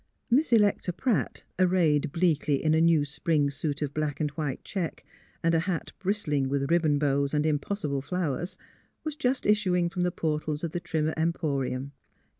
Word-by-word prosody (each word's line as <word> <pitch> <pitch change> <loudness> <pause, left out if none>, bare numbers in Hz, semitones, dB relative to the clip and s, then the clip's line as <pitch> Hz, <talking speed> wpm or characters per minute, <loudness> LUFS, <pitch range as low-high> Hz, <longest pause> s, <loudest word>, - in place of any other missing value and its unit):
Miss 275 +3 +3
Electa 205 -5 +3
Pratt, 220 +5 -1 0.2
arrayed 175 -6 +3
bleakly 155 -4 +1
in 155 0 +3
a 160 - +4
new 165 -3 +4
spring 150 0 0
suit 145 +1 -2
of 145 -1 -3
black 150 -2 -2
and 150 -2 0
white 145 -3 -4
check 185 -5 -4 0.4
and 165 0 +3
a 165 - +4
hat 170 0 -2
bristling 155 -9 0
with 140 +2 -1
ribbon 160 -4 +3
bows 140 0 +1
and 150 +1 +1
impossible 150 -1 -1
flow 170 0 -1
ers, 175 +7 -5 0.5
was 310 -2 -3
just 265 -3 0
issuing 185 -5 +2
from 180 - -2
the 180 - +2
portals 155 -1 -2
of 170 - -2
the 175 - -2
Trimmer 160 -2 -1
Emporium. 140 -5 -1
160 Hz, 175 wpm, -28 LUFS, 145-180 Hz, 0.5 s, a